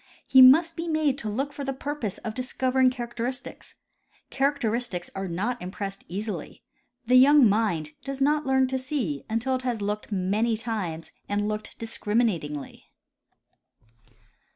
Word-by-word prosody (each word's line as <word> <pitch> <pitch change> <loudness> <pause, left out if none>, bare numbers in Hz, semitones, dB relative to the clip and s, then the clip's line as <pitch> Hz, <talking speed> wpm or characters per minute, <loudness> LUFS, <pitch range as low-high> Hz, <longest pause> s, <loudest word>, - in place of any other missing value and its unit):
He 260 - +7
must 305 +6 +7
be 335 +1 -4
made 310 -4 +1
to 215 - 0
look 270 +7 -2
for 285 - -6
the 270 0 -2
purpose 265 -8 -4
of 220 -2 -6
discovering 255 +1 +1
characteristics. 245 0 -5 0.6
Characteristics 245 -9 -1
are 195 0 -4
not 210 +8 -2
impressed 195 +1 -6
easily. 195 -2 -5 0.4
The 250 +2 +5
young 275 0 +7
mind 195 -8 0
does 275 0 -5
not 295 +2 +2
learn 265 -1 +2
to 260 0 -1
see 255 - -3
until 230 +4 0
it 255 - -1
has 245 -3 -2
looked 210 +2 -3
many 210 +4 0
times 200 -8 -4 0.2
and 205 +1 0
looked 215 0 -5
discriminatingly. 210 - -2
235 Hz, 140 wpm, -26 LUFS, 205-265 Hz, 0.6 s, He